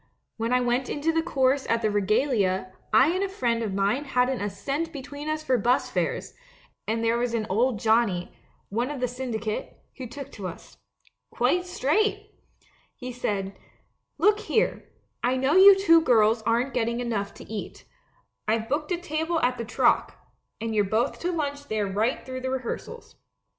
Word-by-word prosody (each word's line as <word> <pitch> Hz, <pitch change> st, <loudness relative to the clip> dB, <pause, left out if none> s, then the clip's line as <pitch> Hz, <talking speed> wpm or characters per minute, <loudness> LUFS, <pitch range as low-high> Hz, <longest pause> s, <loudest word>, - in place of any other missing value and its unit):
When 230 Hz, +1 st, -2 dB
I 250 Hz, 0 st, +3 dB
went 245 Hz, +1 st, 0 dB
into 300 Hz, +3 st, 0 dB
the 325 Hz, 0 st, +1 dB
chorus 270 Hz, -4 st, +1 dB
at 230 Hz, 0 st, +1 dB
the 215 Hz, -, +2 dB
Regalia, 205 Hz, -3 st, +1 dB, 0.2 s
I 240 Hz, +7 st, +6 dB
and 375 Hz, +2 st, 0 dB
a 395 Hz, -, -1 dB
friend 240 Hz, -11 st, 0 dB
of 220 Hz, -3 st, -2 dB
mine 205 Hz, +9 st, +1 dB
hadn't 250 Hz, -2 st, +1 dB
a 205 Hz, -, -1 dB
cent 285 Hz, +11 st, -3 dB
between 285 Hz, +1 st, -7 dB
us 310 Hz, 0 st, -2 dB
for 255 Hz, -4 st, +2 dB
bus 245 Hz, +5 st, +1 dB
fares; -, -, -2 dB, 0.5 s
and 225 Hz, +1 st, -1 dB
there 230 Hz, +1 st, +2 dB
was 240 Hz, -1 st, -1 dB
an 220 Hz, -2 st, -1 dB
old 235 Hz, +4 st, +2 dB
Johnnie 220 Hz, -5 st, +1 dB, 0.2 s
— -, -, -38 dB
one 235 Hz, +6 st, -1 dB
of 295 Hz, -2 st, -5 dB
the 250 Hz, -, 0 dB
syndicate 230 Hz, -4 st, -4 dB
— -, -, -37 dB
who 260 Hz, -2 st, -6 dB
took 280 Hz, +3 st, -9 dB
to 195 Hz, -3 st, -6 dB
us. 175 Hz, -, -11 dB, 0.5 s
Quite 355 Hz, +9 st, +1 dB
straight! 360 Hz, +6 st, 0 dB, 0.6 s
He 255 Hz, -2 st, -7 dB
said, 200 Hz, -5 st, -3 dB, 0.6 s
"Look 420 Hz, +1 st, +4 dB
here, 440 Hz, +1 st, -1 dB, 0.3 s
I 250 Hz, +2 st, +1 dB
know 265 Hz, +3 st, +1 dB
you 390 Hz, +1 st, +9 dB
two 330 Hz, -4 st, +6 dB
girls 225 Hz, -5 st, +4 dB
aren't 240 Hz, +4 st, +1 dB
getting 235 Hz, 0 st, 0 dB
enough 215 Hz, -5 st, -3 dB
to -, -, -11 dB
eat; 215 Hz, -2 st, -7 dB, 0.6 s
I've 220 Hz, +1 st, 0 dB
booked 300 Hz, +5 st, -2 dB
a 355 Hz, -, +1 dB
table 325 Hz, 0 st, -1 dB
at 250 Hz, 0 st, +1 dB
the 230 Hz, -, -3 dB
Troc, 230 Hz, -, +2 dB, 0.4 s
and 225 Hz, 0 st, -3 dB
you're 210 Hz, -1 st, +3 dB
both 220 Hz, +6 st, 0 dB
to 355 Hz, -, -1 dB
lunch 285 Hz, -3 st, -3 dB
there 215 Hz, -3 st, -1 dB
right 210 Hz, +6 st, -1 dB
through 255 Hz, 0 st, -6 dB
the 260 Hz, -, -2 dB
rehearsals. 260 Hz, -, -5 dB
250 Hz, 185 wpm, -26 LUFS, 220-290 Hz, 0.6 s, you